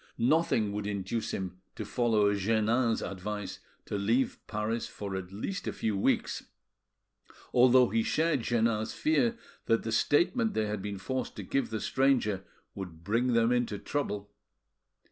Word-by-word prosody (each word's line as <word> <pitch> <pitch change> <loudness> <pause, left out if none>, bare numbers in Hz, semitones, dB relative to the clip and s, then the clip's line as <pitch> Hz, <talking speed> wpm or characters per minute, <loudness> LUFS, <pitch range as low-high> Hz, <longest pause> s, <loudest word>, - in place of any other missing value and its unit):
Nothing 120 -4 +2
would 105 0 -3
induce 105 +2 -2
him 95 -1 -4
to - - -5
follow 110 -4 +2
Jeannin's 110 +4 +1
advice 100 +1 -5 0.3
to 100 - -3
leave 115 +6 +1
Paris 110 +2 -2
for 100 -2 -6
at 95 -1 -5
least 185 - -4
a - - 0
few 110 -2 -1
weeks, 95 - 0 1.1
although 125 0 +6
he 115 +1 +2
shared 155 +2 +1
Jeannin's 115 -2 +1
fear 245 -7 +2 0.3
that 115 - +3
the 115 - -3
statement 210 - +2
they 110 - +1
had 105 -1 -3
been 100 0 -4
forced 130 +7 -3
to - - -6
give 135 - -1
the 110 -1 -3
stranger 125 -8 +1 0.3
would 90 -4 -8
bring 115 +6 +1
them 115 0 +4
into 120 -4 +1
trouble. 105 -6 -3
110 Hz, 150 wpm, -30 LUFS, 100-125 Hz, 1.1 s, although